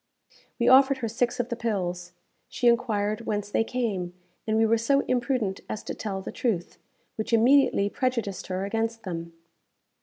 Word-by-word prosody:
We - - +1
offered 270 +1 +6
her 240 -3 -3
six 240 +2 -1
of 245 0 -1
the 235 - -2
pills. 180 -6 -3 0.4
She 245 - -3
enquired 220 -2 +1
whence 205 -1 -2
they 225 - +2
came, 205 -8 -3 0.3
and 220 0 +1
we 225 - +4
were 225 +1 +3
so 275 +5 +3
imprudent 240 -6 -1
as 215 - -4
to - - -5
tell 195 -3 -4
the - - -6
truth, 205 -9 -2 0.4
which 220 +1 -3
immediately 240 -2 +4
prejudiced 225 -5 -2
her 185 +1 -2
against 225 +2 -2
them. 170 -2 -5
225 Hz, 170 wpm, -26 LUFS, 200-240 Hz, 0.4 s, offered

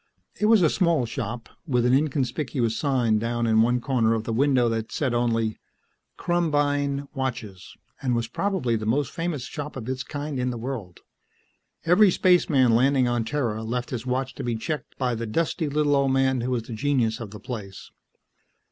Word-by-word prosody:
It 210 - +2
was 220 -4 +5
a 160 - +5
small 170 -9 +2
shop, 115 -1 -5 0.2
with 125 -4 +1
an 125 - +3
inconspicuous 135 -4 0
sign 120 -7 +1
down 120 +1 -1
in 110 -1 +4
one 120 +2 +2
corner 120 -3 +1
of 110 - -2
the 115 - -3
window 130 0 +3
that 115 -1 -2
said 130 -5 -1
only, 115 -2 0 0.6
"KRUMBEIN 145 -4 0
watches," 120 -9 -5 0.3
and 125 -3 0
was 115 -1 -1
probably 160 - -1
the 110 -1 -3
most 135 +5 +1
famous 165 -6 -3
shop 150 +1 -6
of 120 -4 -6
its 130 0 -3
kind 145 0 -5
in 125 0 0
the 120 - -4
world. 115 -7 -6 0.8
Every 180 +5 +6
spaceman 160 -10 +3
landing 130 +2 +3
on 120 -2 0
Terra 115 -4 -2
left 125 +2 -3
his 120 -3 -3
watch 130 +1 -1
to - - -7
be 120 -1 -1
checked 150 +7 -5
by 125 -2 0
the 115 0 -4
dusty, 160 +5 -1
little 145 0 +2
old 135 -1 +2
man 130 -1 +2
who 125 - -2
was 125 -3 -1
the 115 - -8
genius 120 -2 0
of 115 -3 -6
the 105 +1 -10
place. 100 -4 -8
125 Hz, 185 wpm, -25 LUFS, 115-145 Hz, 0.8 s, Every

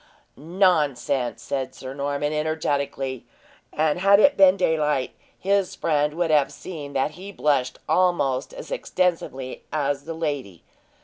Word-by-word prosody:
"Nonsense!" 150 -6 +1
said 130 -1 -3
Sir 130 0 -7
Norman, 145 +1 -2
energetically. 140 -4 -2 0.5
And 155 +2 +1
had 200 +2 +6
it 285 +6 +5
been 190 -1 +6
daylight, 150 -7 +1 0.3
his 195 -1 0
friend 150 -1 0
would 170 -1 0
have 150 -3 +3
seen 150 -6 -8
that 135 +2 0
he 195 +3 -9
blushed 145 -8 0
almost 175 - +1
as - - -10
extensively 175 - -2
as 145 -2 -1
the 165 0 -5
lady. 145 - -4
150 Hz, 130 wpm, -24 LUFS, 140-180 Hz, 0.5 s, had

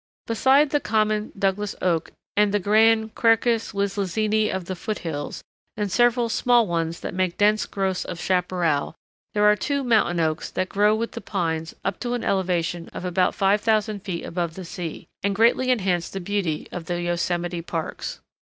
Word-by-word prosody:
] - - -83
Besides 265 +6 +3
the 290 - +3
common 215 -3 0
Douglas 195 +1 0
Oak 170 -3 0 0.2
and 210 0 +3
the 205 - +2
grand 220 +2 +3
Quercus 230 0 +2
Wislizeni 205 +2 0
of 190 -2 -3
the 185 - -4
foot 215 +4 -4
hills, 145 -3 -4 0.3
and 205 -2 -2
several 240 +4 +3
small 240 +1 +3
ones 165 -2 -2
that - - -5
make 185 -1 -1
dense 210 +1 +3
growths 190 -2 -1
of 175 - -6
chaparral, 180 -5 0 0.4
there 210 - +3
are 210 0 +6
two 280 +5 -1
mountain 220 -8 +2
oaks 160 0 0
that 185 0 -2
grow 210 +1 +3
with 230 +1 -2
the 230 - -7
pines 165 -4 -2
up - - -1
to 245 0 -2
an 240 - -4
elevation 175 -3 -1
of - - -7
about 180 0 +1
5000 210 +1 +2
feet 185 -4 -5
above 170 -1 -3
the 185 - -7
sea, 170 -1 -6 0.2
and 200 0 0
greatly 235 +4 +3
enhance 190 -8 +1
the 195 - -5
beauty 180 -4 -2
of 175 -2 -6
the 175 0 -2
yosemite 175 0 -1
parks. 165 -1 -5
195 Hz, 180 wpm, -24 LUFS, 175-220 Hz, 0.4 s, are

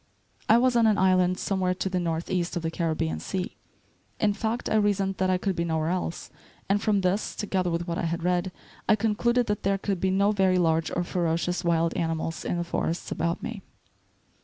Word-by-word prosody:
I 225 - +7
was 250 0 +3
on 230 -1 +5
an 215 -2 +3
island 185 -1 +3
somewhere 185 -2 0
to 190 - -2
the 185 -1 -1
northeast 170 +1 -2
of 175 - -2
the 165 - -1
Caribbean 155 - -1
sea, 180 - -4 0.6
in 205 -1 +2
fact, 225 +3 -2
I - - -1
reasoned 200 -2 +1
that 185 0 +1
I 185 - +3
could 190 0 -1
be 170 - 0
nowhere 160 -1 0
else; 180 -1 -3 0.4
and 200 +1 +2
from 210 -3 +2
this, 190 +3 0
together 190 -4 -1
with 170 +1 -2
what 170 -1 -2
I - - -1
had 165 +1 -2
read, 180 +1 +1 0.4
I 215 - +7
concluded 230 +3 +1
that 210 -2 -2
there 195 0 +1
could 195 -1 -2
be 190 - +1
no 200 +2 +3
very 190 -3 +3
large 165 -2 +2
or 175 - 0
ferocious 175 +1 -1
wild 170 -1 +1
animals 165 -1 -2
in 175 - -1
the 175 - -1
forests 170 0 -3
about 170 +1 -1
me. 230 -4 -5
185 Hz, 210 wpm, -26 LUFS, 170-200 Hz, 0.6 s, I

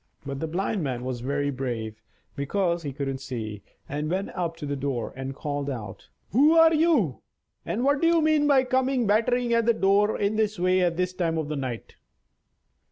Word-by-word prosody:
But 140 0 -4
the 160 - -2
Blind 190 +4 -1
Man 130 -5 -3
was 130 -2 -3
very 145 +2 -1
brave 115 -5 -4 0.3
(because 170 +4 0
he 145 -3 -4
couldn't 135 -1 -4
see), 110 -6 -6 0.3
and 150 +2 -3
went 190 +3 -2
up 170 -3 -3
to 160 - -6
the 145 0 -2
door 135 -3 -3
and 135 +1 -5
called 145 -1 -3
out: 110 -7 -7 0.2
"Who 285 - +5
are 325 0 +7
you, 300 - +2 0.5
and 240 - -1
what 280 +1 +2
do 330 - +4
you 335 0 +4
mean 310 -2 +3
by 275 -3 +5
coming 260 -1 +1
battering 235 +3 +2
at 230 -1 +2
the 235 - +4
door 200 +2 +3
in 205 +1 0
this 215 -1 0
way 185 +1 +2
at 175 -2 +1
this 180 0 0
time 165 -3 -1
of 155 -2 -2
night?" 130 -6 -5
170 Hz, 195 wpm, -26 LUFS, 135-230 Hz, 0.5 s, are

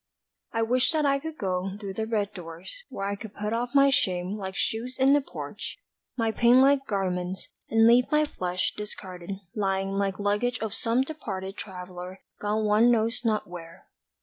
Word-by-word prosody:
I 225 0 +1
wish 250 +3 +3
that 310 -2 +2
I 275 0 +3
could 320 +2 -6
go 190 -2 -2
Through 200 -2 -5
the 220 +3 -3
red 210 -2 -1
doors 175 - -8
where 195 - -4
I 200 0 -1
could 210 0 -10
put 210 +2 -2
off 240 +3 -2
My 275 0 +7
shame 185 -8 +1
like 190 -2 -5
shoes 240 +6 -2
in 270 +1 +5
the 290 - +5
porch, - - -7 0.4
My 225 -2 +1
pain 240 +3 +5
like 275 0 +4
garments, 185 -2 -2 0.2
And 225 0 +5
leave 240 +2 +6
my 305 0 +4
flesh 180 -9 -2
discarded 190 -3 -7 0.2
lying 195 -2 0
Like 195 -1 0
luggage 210 +5 0
of 220 -2 -3
some 230 +2 +1
departed 195 -10 -5
traveller 180 -1 -8 0.2
Gone 215 +1 0
one 210 +3 +5
knows 230 0 +2
not 220 -2 +1
where. 170 -2 -10
210 Hz, 180 wpm, -27 LUFS, 190-245 Hz, 0.4 s, My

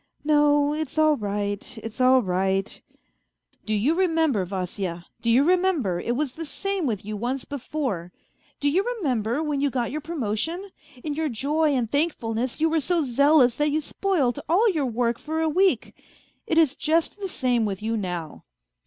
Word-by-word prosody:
..." - - -54
" - - -42
No, 295 -1 +3
it's 310 -1 -4
all 310 -1 +5
right, 205 0 -3
it's 225 +3 -5
all 255 0 +5
right... 190 +1 -1 0.3
." - - -49
" - - -41
Do 215 - +1
you 240 +10 +2
remember, 325 - +2
Vasya, 180 -2 -4 0.2
do 235 - 0
you 245 +4 +5
remember 340 - +2
it 240 +6 -2
was 280 -1 -2
the 330 - -6
same 385 +1 -2
with 210 -5 -3
you 215 0 -4
once 245 +5 -3
before; 255 - -4 0.5
do 290 - 0
you 350 +7 +2
remember, 255 - -1
when 295 -3 -1
you 285 - +2
got 245 -3 -2
your 305 +3 -3
promotion, 320 - -3 0.3
in 300 - -2
your 315 +1 -1
joy 290 +5 +1
and 245 -3 0
thankfulness 255 -6 -1
you 320 - +3
were 320 -1 +1
so 340 +2 +1
zealous 270 -1 +4
that 295 0 +2
you 300 +2 +1
spoilt 305 - 0
all 390 +8 +4
your 300 -7 -1
work 235 0 0
for 315 +1 -3
a 320 - +1
week? 370 +5 +2 0.5
It 325 - 0
is 305 -4 +4
just 325 +5 0
the 390 -2 -4
same 250 -7 +1
with 200 0 -4
you 225 +1 -1
now." 180 -6 -5
280 Hz, 190 wpm, -25 LUFS, 225-315 Hz, 0.5 s, all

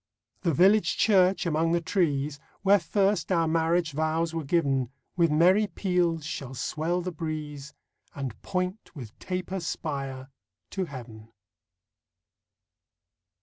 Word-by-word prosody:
The 170 - +1
village 200 +7 +4
church 190 -3 +4
among 165 0 +1
the 170 - +3
trees, 150 -5 0 0.2
Where 200 +1 +6
first 200 +2 +1
our 165 -2 +3
marriage 165 +1 +1
vows 160 +2 0
were 165 -1 -2
given, 135 -5 +1 0.3
With 170 -2 +3
merry 180 +7 +4
peals 175 -4 0
shall 135 -4 -5
swell 160 +7 -1
the 180 +1 -4
breeze 150 -3 -6 0.4
And 135 -5 -5
point 185 +1 -3
with 120 -7 -10
taper 185 +1 -3
spire 135 -5 -4 0.4
to 190 -2 -2
Heaven. 115 -6 -10
165 Hz, 120 wpm, -27 LUFS, 145-180 Hz, 0.4 s, Where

